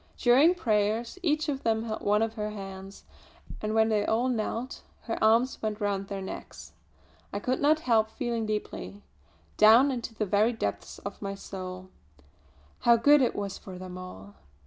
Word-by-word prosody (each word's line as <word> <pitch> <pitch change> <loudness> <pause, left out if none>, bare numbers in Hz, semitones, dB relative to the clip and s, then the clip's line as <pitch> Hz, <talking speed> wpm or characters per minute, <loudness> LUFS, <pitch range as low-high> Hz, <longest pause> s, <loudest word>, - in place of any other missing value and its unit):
During 275 +9 +5
prayers 220 - 0
each 310 -2 +1
of 275 -2 -2
them 220 -1 0
held 220 -1 -4
one 210 +2 +2
of 225 0 -2
her 210 -2 -3
hands; 195 -1 -9 0.6
and 215 +1 -2
when 220 0 +4
they 210 -2 +2
all 230 +4 +1
knelt, 235 +2 -3 0.2
her 225 - -3
arms 230 +4 +3
went 215 -1 -3
round 200 -2 -1
their 195 -1 -5
necks. 190 - -9 0.6
I - - -3
could 250 +5 -1
not 305 +2 +3
help 225 -5 +2
feeling 235 -3 -3
deeply 210 -1 -5 0.5
down 230 +6 +7
into 240 -3 -5
the 215 - -1
very 210 +4 +2
depths 100 - -4
of 200 0 -8
my 195 -1 -4
soul 185 -1 -8 0.9
how 235 - +5
good 285 +5 +5
it 250 - +1
was 200 -1 -4
for 185 -2 -10
them 185 0 -8
all. 100 - -10
220 Hz, 170 wpm, -28 LUFS, 200-240 Hz, 0.9 s, down